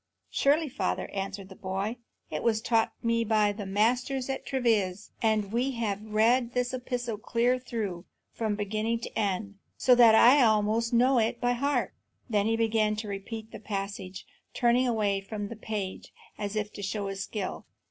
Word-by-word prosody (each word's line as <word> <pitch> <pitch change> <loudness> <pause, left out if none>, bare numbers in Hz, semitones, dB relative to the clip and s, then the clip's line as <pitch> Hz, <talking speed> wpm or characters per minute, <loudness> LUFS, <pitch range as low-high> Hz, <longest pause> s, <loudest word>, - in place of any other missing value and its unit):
"Surely, 300 +3 +3
father," 275 +1 -2
answered 195 0 -4
the 190 - -12
boy; 195 +5 -3 0.3
"it - - -2
was 225 -2 +2
taught 225 0 +1
me 230 0 +2
by 215 -2 +3
the 205 -1 -6
masters 250 +6 +1
at 270 - -5
Treves; 215 -7 0
and 215 -2 +1
we 255 +3 +1
have 210 -4 -2
read 230 +3 +2
this 250 0 0
epistle 245 -3 -3
clear 240 +3 +1
through, 210 -8 -4 0.3
from 220 -2 -1
beginning 215 +3 -1
to - - -7
end, 200 -1 -2 0.2
so 255 - +5
that 235 -2 +7
I 255 +6 +7
almost 220 0 +2
know 250 +2 +4
it 230 +1 0
by 245 0 +2
heart." 280 +4 0 0.3
Then 210 -3 +1
he 225 - +2
began 220 -1 +2
again - - -3
to 215 0 -5
repeat 220 +3 -6
the - - -8
passage, 195 -3 -5 0.3
turning 245 +1 +3
away 205 -4 +1
from 205 +1 -5
the 230 - -6
page 210 -3 -5 0.2
as 205 0 -4
if 210 -1 -2
to - - -7
show 200 +1 -2
his 195 0 -4
skill. 205 -3 -5
220 Hz, 180 wpm, -28 LUFS, 205-240 Hz, 0.3 s, that